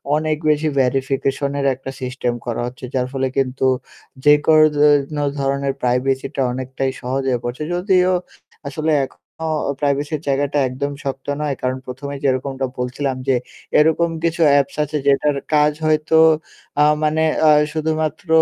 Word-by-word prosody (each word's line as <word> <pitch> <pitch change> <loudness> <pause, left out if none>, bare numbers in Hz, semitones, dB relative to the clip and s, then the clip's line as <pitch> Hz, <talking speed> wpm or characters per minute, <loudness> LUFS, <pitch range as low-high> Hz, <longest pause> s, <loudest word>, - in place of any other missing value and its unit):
অনেক 155 0 0
বেশি 150 +1 +2
ভেরিফিকেশনের 135 +2 -1
একটা 135 +1 -8
সিস্টেম 125 -1 -2
করা 120 -1 -2
হচ্ছে। 125 +1 -8
যার 125 -1 0
ফলে 135 -1 0
কিন্তু 130 0 +1 0.6
যে 150 - +8
কোনো 155 -1 +6
যেনো 145 0 +3 0.2
ধরনের 140 0 0
প্রাইভেসিটা 130 +3 0
অনেকটাই 130 +1 -3
সহজে 135 +2 -1
হয়ে 120 -2 -1
পড়ছে 120 +5 -4
যদিও 185 0 +2 0.6
আসলে 155 +3 -1
এখনো 90 - -19 0.6
প্রাইভেসির 145 +1 -1
জায়গাটা 140 +1 0
একদম 140 +3 -3
শক্ত 135 -1 -5
নয়, 145 -2 -1
কারণ 130 0 -1
১ম 130 +3 -7
এ - - -5
যেরকমটা 135 0 0
বলছিলাম 130 +2 -2
যে 130 - +3 0.4
এরকম 160 +2 +3
কিছু 170 0 0
অ্যাপস 140 -1 +2
আছে 150 +1 -3
যেটার 140 +1 +3 0.2
কাজ 150 0 +4
হয়তো 155 +1 +2 0.6
আ - - +7 0.2
মানে 155 +1 +2 0.2
আ - - +7 0.2
শুধুমাত্র 155 +1 -2
140 Hz, 145 wpm, -20 LUFS, 130-150 Hz, 0.6 s, যে